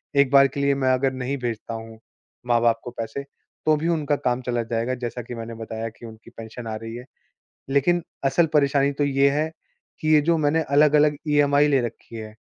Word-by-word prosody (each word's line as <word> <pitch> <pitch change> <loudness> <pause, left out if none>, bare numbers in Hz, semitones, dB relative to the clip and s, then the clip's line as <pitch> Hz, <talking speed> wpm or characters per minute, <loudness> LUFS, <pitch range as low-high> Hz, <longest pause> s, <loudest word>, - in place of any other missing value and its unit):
एक 140 -2 +4
बार 140 0 +7
के 135 +1 -7
लिए 140 0 +2
मैं 135 -1 +1
अगर 130 +1 +1
नहीं 130 +2 -3
भेजता 120 -2 -4
हूँ, 115 0 -8 0.5
माँ-बाप 115 -1 +3
को 120 - -7
पैसे 115 +5 -5 0.4
तो 155 - +4
भी 160 +3 -2
उनका 155 -4 +1
काम 125 -2 -1
चला 120 -1 -1
जाएगा 115 +2 -2
जैसा 120 0 -4
कि 120 +1 -8
मैंने 115 0 -7
बताया 115 0 -5
कि 115 +2 -14
उनकी 110 -1 -12
पेंशन 115 +1 -8
आ 110 - -3
रही 115 +1 -7
है। 120 +1 -8 0.7
लेकिन 170 +6 +2 0.2
असल 160 +5 +3
परेशानी 140 -1 +3
तो 145 +1 -1
ये 140 0 +3
है 150 +3 -1 0.5
कि 155 - -2
ये 150 - +6
जो 165 +3 +2
मैंने 155 +2 +2
अलग-अलग 150 +1 +4
ईएमआई 145 0 +4
ले 140 -2 +3
रखी 115 0 -7
है 110 -1 -8
135 Hz, 205 wpm, -23 LUFS, 115-145 Hz, 0.7 s, बार